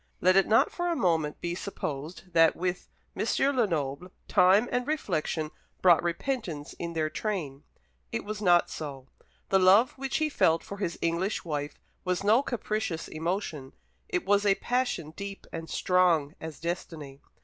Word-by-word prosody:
Let 185 +1 +4
it 195 - +5
not 220 - +4
for 350 0 -2
a 340 - +1
moment 165 - 0
be 170 0 -2
supposed 175 -1 -6
that 165 -1 +5
with 180 0 -3 0.3
M. - - -1 0.3
Lenoble 170 - -1 0.2
time 190 +6 +5
and 250 +1 -1
reflection 165 - -1 0.3
brought 175 -3 +6
repentance 175 - -3
in 170 0 -4
their 160 -1 0
train. 155 -10 -3 0.5
It 115 - -3
was 210 0 -5
not 175 -3 +4
so. 135 -4 -7 0.4
The 195 - +4
love 200 +8 +6
which 270 -1 -1
he 310 - +1
felt 165 - +2
for 200 - -8
his 185 -4 -3
English 170 +5 -1
wife 145 -2 -4 0.2
was 180 +1 -1
no 220 +5 +5
capricious 215 -9 -3
emotion; 160 -4 -3 0.4
it 180 - -1
was 205 +1 +3
a 200 -1 +4
passion 245 -12 -1
deep 200 +3 -7
and 165 0 -6
strong 175 -5 +2
as 160 -2 -7
destiny. 155 -4 -5
180 Hz, 160 wpm, -28 LUFS, 160-205 Hz, 0.5 s, brought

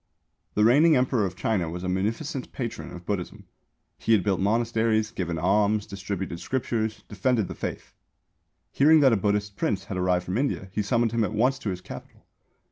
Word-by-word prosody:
The 105 - +3
reigning 150 +8 +6
Emperor 125 -5 +2
of 90 - -8
China 95 -4 -1
was 90 +2 -6
a - - -2
munificent 115 - -2
patron 120 -4 -5
of 90 0 -10
Buddhism. 95 -3 -4 0.5
He 115 - +2
had 100 -5 +4
built 100 -3 +1
monasteries, 110 +1 +1
given 85 -6 -3
alms, 105 +4 +2
distributed 95 -3 -5
scriptures, 110 -2 -2
defended 110 0 0
the - - -6
faith. - - -6 0.8
Hearing 155 +2 +5
that 135 -4 +6
a - - +5
Buddhist 100 0 -1
prince 95 -3 -1
had 95 -1 -5
arrived 90 -1 +1
from 95 +6 -1
India 135 -8 -2
he 105 - -1
summoned 115 +1 +1
him 115 -1 +1
at 105 - -2
once 130 +4 +2
to 105 - -3
his 90 -2 -4
Capital. - - -11
105 Hz, 185 wpm, -26 LUFS, 95-115 Hz, 0.8 s, reigning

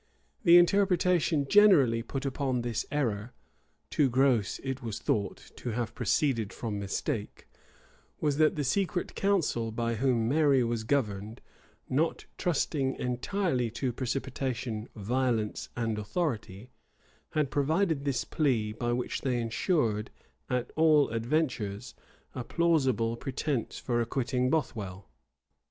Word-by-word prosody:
[*] - - -40
The 170 0 +9
interpretation 175 -5 +3
generally 150 - +6
put 135 +4 -5
upon 130 -2 -1
this 120 -2 -2
error, 120 -5 -1 0.6
too 145 -3 +3
gross, 125 -5 +2
it 135 0 -3
was 115 -3 -4
thought, 105 -4 -2
to 125 - -5
have 120 0 -2
proceeded 115 -8 0
from 110 -4 -4
mistake, 105 +3 -4 0.7
was, 145 -2 0
that 155 0 +4
the 150 - -1
secret 180 +5 -1
council 165 - 0
by 115 +1 -1
whom 115 -1 +1
Mary 140 -1 +4
was 115 -1 -1
governed, 110 -4 -1 0.5
not 155 +5 0
trusting 140 -5 0
entirely 125 - -1
to 120 +2 -2
precipitation, 125 -3 -3
violence, 115 0 -1
and 115 -2 -1
authority, 110 - -3 0.6
had 150 -3 0
provided 155 +1 +1
this 135 -4 0
plea, 115 -8 0
by 120 +2 -2
which 125 +1 -2
they 125 -3 0
insured, 115 - 0 0.4
at 125 -1 -1
all 155 -3 +5
adventures, 115 -4 -1 0.4
a 125 - -4
plausible 130 -9 +1
pretence 130 0 -3
for 120 -2 -1
acquitting 125 +1 0
Bothwell. 105 - -2
125 Hz, 125 wpm, -29 LUFS, 115-150 Hz, 0.7 s, The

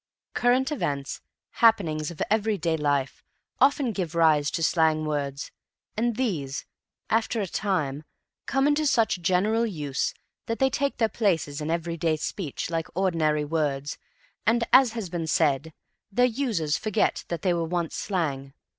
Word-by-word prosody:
Current 255 +4 +2
events, 140 - -3 0.4
happenings 165 -10 +3
of 170 - -3
everyday 205 -6 +1
life, 145 -3 -1 0.4
often 270 -2 +3
give 180 -5 -4
rise 155 -3 +4
to 165 - -2
slang 160 -2 +2
words, 140 -2 -3 0.4
and 235 +1 0
these, 165 - -2 0.5
after 225 +1 +1
a 205 - 0
time, 160 -7 -2 0.4
come 270 0 +2
into 295 +1 +2
such 225 -9 +2
general 200 +6 +2
use 150 - -2 0.3
that 230 -1 -1
they 265 0 +2
take 280 +1 -1
their 225 - +3
places 165 -9 0
in 150 - -3
everyday 165 -1 0
speech 160 0 -4
like 165 -1 -1
ordinary 160 -5 +1
words 145 -2 -2 0.5
and, 235 +1 +3
as 255 -3 +7
has 225 -5 -4
been 170 -2 -4
said, 155 -1 +1 0.4
their 245 +5 +4
users 220 - 0
forget 215 -2 0
that 170 - -4
they 185 -2 +3
once 170 0 -1
were - - -4
slang. 140 -8 -2
170 Hz, 145 wpm, -26 LUFS, 150-225 Hz, 0.5 s, as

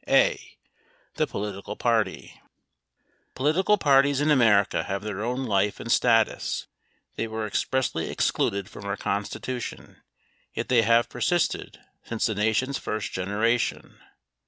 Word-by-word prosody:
A. - - +2 0.6
The - - +1
Political 100 0 -5
Party 110 -5 -1 0.9
Political 175 +10 +2
parties 140 -4 +4
in 150 +1 +2
America 115 -7 +4
have 100 0 -3
their 105 -1 -4
own 125 +3 -2
life 100 -2 +1
and 115 - -4
status. 115 -3 +2 0.5
They 115 - -1
were 110 0 -4
expressly 105 -4 -1
excluded 100 -1 0
from 100 - -11
our 100 0 -2
Constitution, 105 +5 -4 0.5
yet - - -3
they 125 -2 +5
have 115 +2 +3
per - - -10
sisted 175 -2 0 0.3
since 115 -2 -2
the 110 - 0
Nation's 110 +7 0
first 110 -2 -4
generation. 105 +6 -1
115 Hz, 130 wpm, -26 LUFS, 100-130 Hz, 0.9 s, they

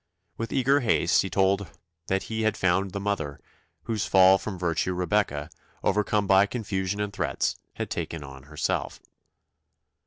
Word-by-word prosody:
With 115 -1 -5
eager 135 +2 +3
haste 120 - +3
he 95 - -3
told 95 +1 +1 0.4
that 95 0 0
he 110 0 -3
had 110 -2 +1
found 95 +2 +2
the 100 - -5
mother, 100 -8 -2 0.4
whose 110 -2 -2
fall 95 0 +6
from 100 -2 -5
virtue 90 +1 -1
Rebecca, 90 -4 0 0.3
overcome 105 0 +1
by 95 +1 +5
confusion 100 -3 -3
and 105 -1 -2
threats, - - -1 0.2
had - - -4
taken 80 -3 -4
on 65 -1 -11
herself. 75 - -2
95 Hz, 150 wpm, -26 LUFS, 90-105 Hz, 0.4 s, fall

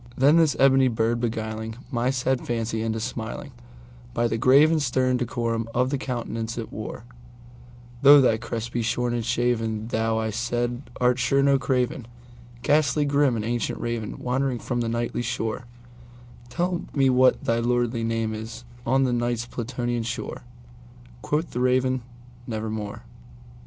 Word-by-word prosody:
Then 145 +5 +5
this 160 -3 +4
ebony 135 -1 +5
bird 115 0 0
beguiling 110 -1 -3 0.2
my 120 0 +1
sad 130 -1 0
fancy 115 -1 -2
into 110 0 -1
smilingBy - - -5
the 115 - -1
grave 140 +6 +6
and 160 -2 +2
stern 130 -1 +1
decorum 115 -2 -2
of 125 +2 +2
the 140 - +1
countenance 115 -3 -4
it 115 - -6
wore,—"Though 120 - 0
thy 125 -5 +4
crest 115 0 -5
be 120 - -1
shorn 120 +1 0
and 120 -1 -1
shaven, 115 -2 0
thou," 110 -1 0
I 110 0 -1
said, 120 +3 -2
"art 125 0 +3
sure 135 +2 +2
no 140 -1 +4
craven, 125 -2 -1 0.6
Ghastly 150 0 +3
grim 140 -3 +2
and 110 -1 -2
ancient 120 0 -2
Raven 115 -2 -3
wandering 130 0 -1
from 120 +1 -2
the 115 - -1
Nightly 115 +1 -2
shore:Tell 120 +6 -5
me 135 -2 +4
what 130 0 +4
thy 115 0 +1
lordly 120 -1 0
name 115 -1 -1
is 110 +2 -7 0.2
on 135 +2 +3
the 125 -2 +1
Night's 120 -1 -1
Plutonian 120 0 -3
shore!"Quoth 120 +5 -6
the 125 - -3
Raven, 130 0 +2 0.5
"Nevermore." 110 -2 -4
120 Hz, 145 wpm, -25 LUFS, 115-125 Hz, 0.6 s, grave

